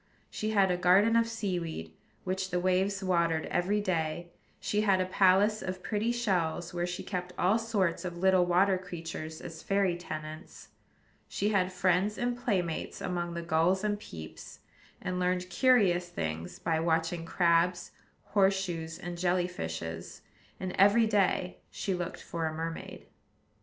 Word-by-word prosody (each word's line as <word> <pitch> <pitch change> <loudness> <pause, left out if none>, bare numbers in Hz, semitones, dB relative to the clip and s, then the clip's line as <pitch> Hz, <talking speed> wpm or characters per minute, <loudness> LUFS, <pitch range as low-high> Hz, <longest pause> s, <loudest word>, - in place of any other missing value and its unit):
She 215 - -2
had 195 -3 +3
a 180 - +1
garden 190 +6 +5
of 230 0 +4
sea 210 -6 -2
weed, 120 - -6 0.3
which 185 0 -2
the 180 -1 0
waves 190 +2 +1
watered 170 -3 +1
every 200 +4 +1
day: 170 -2 -2 0.3
she 210 - 0
had 195 -3 +3
a 185 - +1
palace 195 +3 +3
of 185 0 -5
pretty 220 +2 0
shells, 180 -8 -1
where 175 0 -1
she 180 +1 -4
kept 180 -2 -4
all 195 +6 +3
sorts 205 -7 0
of 175 -1 -5
little 190 0 +4
water 185 +2 +3
creatures 165 -3 -7
as 165 -2 -8
fairy 195 -3 +1
tenants; 155 -2 -8 0.6
she 205 - -1
had 190 -3 +1
friends 185 +3 +1
and 245 0 0
playmates 195 -10 -2
among 175 -1 -3
the 170 - -4
gulls 170 +4 +2
and 205 -1 0
peeps, 80 - -10 0.4
and 180 0 -2
learned 180 0 0
curious 195 -9 +3
things 80 - -4
by 165 -1 0
watching 165 +1 0
crabs, 175 0 +2 0.3
horse 195 -1 +3
shoes, 165 -3 -4
and 175 0 -6
jelly 180 0 +2
fishes; 80 - -6 0.4
and 185 -1 -3
every 205 +4 +6
day 195 -3 +1
she 195 - -3
looked 175 -1 -4
for 165 -1 -3
a 155 - -3
mermaid. 165 +1 -6
180 Hz, 155 wpm, -30 LUFS, 170-195 Hz, 0.6 s, every